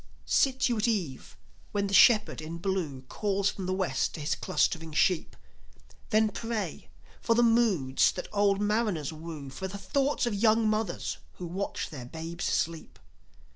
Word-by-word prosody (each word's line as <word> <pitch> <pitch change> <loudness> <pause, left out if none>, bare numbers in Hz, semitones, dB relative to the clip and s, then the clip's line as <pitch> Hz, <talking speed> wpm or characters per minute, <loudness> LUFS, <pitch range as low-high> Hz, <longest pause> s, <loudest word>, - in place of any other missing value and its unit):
Sit 265 -1 +2
you 240 -2 0
at 215 - +1
eve 180 - -3 0.4
when 200 -1 +1
the 200 - -4
Shepherd 210 -4 +5
in 160 +2 -6
Blue 170 -7 -2
Calls 200 +7 -1
from 190 -2 -6
the - - -1
West 185 -8 -1
to - - -7
his 150 -1 -1
clustering 165 +1 0
sheep. 175 +3 +1 0.7
Then 215 0 +3
pray 225 0 -4 0.3
for 230 - +2
the 240 - +4
moods 215 - +3
that 180 - -6
old 200 -1 +3
mariners 205 -8 0
woo, 155 -3 -8
For 190 +8 -5
the 200 +2 -7
thoughts 275 +8 0
of 240 - -1
young 220 +2 +3
mothers 215 -4 -1
who 180 - -7
watch 185 +4 -4
their 135 -5 -7
babes 165 +6 -6
sleep. 165 -1 -2
195 Hz, 165 wpm, -29 LUFS, 160-215 Hz, 0.7 s, Shepherd